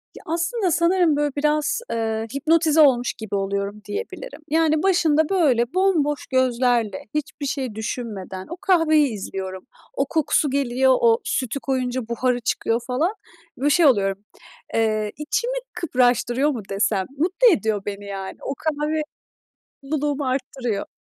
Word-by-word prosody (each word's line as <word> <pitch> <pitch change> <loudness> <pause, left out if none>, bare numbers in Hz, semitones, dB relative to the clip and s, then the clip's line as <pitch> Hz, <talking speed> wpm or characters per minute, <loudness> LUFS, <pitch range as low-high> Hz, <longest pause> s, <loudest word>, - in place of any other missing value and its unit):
Ya, - - -12
aslında 345 +5 -1
sanırım, 340 0 +3
böyle, 295 -1 0
biraz, 300 +8 +1
eee, 225 -1 -2
hipnotize 315 +2 +3
olmuş 250 -4 +4
gibi 220 -3 -5
oluyorum, 200 +1 -2
diyebilirim. 470 -1 -6
Yani, 315 -1 +2
başında, 320 -5 +3
böyle, 270 -10 +2
bomboş 335 -7 +1
gözlerle, 245 -5 +1
hiçbir 295 -1 -3
şey 265 -5 -3
düşünmeden 210 -4 -5
o 340 - -6
kahveyi 325 -6 +4
izliyorum. 190 -2 -6 0.3
O - - 0
kokusu 300 -2 +1
geliyor. 260 -1 +2
O 460 0 +4
sütü 255 0 -2
koyunca 255 -3 -2
buharı 245 +1 0
çıkıyor, 230 0 0
falan. 305 +10 0 0.4
Böyle, 285 +3 +1
şey 330 +3 +4
oluyorum, 195 -8 +3 0.6
eee, 215 -2 +1
içimi 475 +12 -1 0.2
kıpraştırıyor 250 -2 +1
mu 245 -7 -3
desem? 195 -1 0
Mutlu 375 +11 +3
ediyor 220 -9 0
beni, 205 0 -5
yani. 195 -1 -6
O - - -3
kahve 310 +1 -1 0.8
mutluluğumu 290 0 -2
arttırıyor. 255 -5 -2
270 Hz, 135 wpm, -22 LUFS, 225-315 Hz, 0.8 s, olmuş